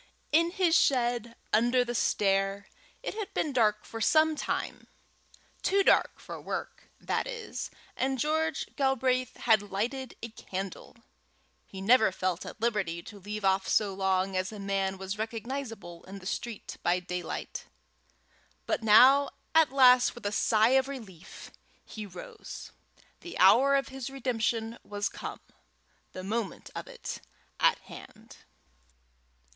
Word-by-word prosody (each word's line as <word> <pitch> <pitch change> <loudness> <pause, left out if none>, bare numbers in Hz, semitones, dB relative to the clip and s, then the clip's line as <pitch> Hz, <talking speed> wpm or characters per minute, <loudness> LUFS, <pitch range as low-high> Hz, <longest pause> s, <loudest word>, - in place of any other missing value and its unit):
In 335 +3 +4
his 350 -2 +2
shed 240 -4 +2 0.2
under 240 +3 +4
the 240 - -3
stair 195 -2 +1 0.4
it - - -3
had 425 -3 -5
been 295 - 0
dark 210 -4 +2
for 225 - -7
some 315 +6 +4
time - - -3 0.7
too 395 +1 +3
dark - - +3
for - - -8
work, - - -6
that - - -1
is, 475 -2 -5 0.3
and 265 +1 0
George 315 +4 0
Galbraith 260 -2 +1
had 220 -3 +4
lighted 245 +6 -3
a 230 - -4
candle: 195 -3 -7 0.7
he 190 - -9
never 220 +1 +5
felt 185 -1 -2
at - - -9
liberty 200 -7 -1
to 205 - -11
leave 205 +1 -5
off 190 0 +2
so 205 -3 +2
long 190 0 0
as 185 +1 -1
a 215 - -8
man 195 -1 -1
was 190 +2 -5
recognizable 225 -5 -5
in 195 +2 -9
the 190 - -12
street 220 +3 -5
by 175 +1 +2
daylight. 180 -1 -5 1.0
But - - -1
now 255 +6 +7 0.2
at 320 -4 +5
last, 255 -2 +6
with 240 - -11
a 205 - 0
sigh 215 +1 +3
of 265 0 +3
relief, 215 -11 -10 0.3
he 215 -2 -7
rose. 180 -2 -9 0.5
The 350 - -8
hour 250 +9 +6
of 275 -1 0
his 265 -1 -6
redemption 235 -3 -2
was 205 0 -2
come, - - -7 0.7
the 185 - -7
moment 215 0 -3
of - - -6
it - - -7 0.4
at - - +4
hand. - - -13
225 Hz, 140 wpm, -29 LUFS, 195-265 Hz, 1.0 s, now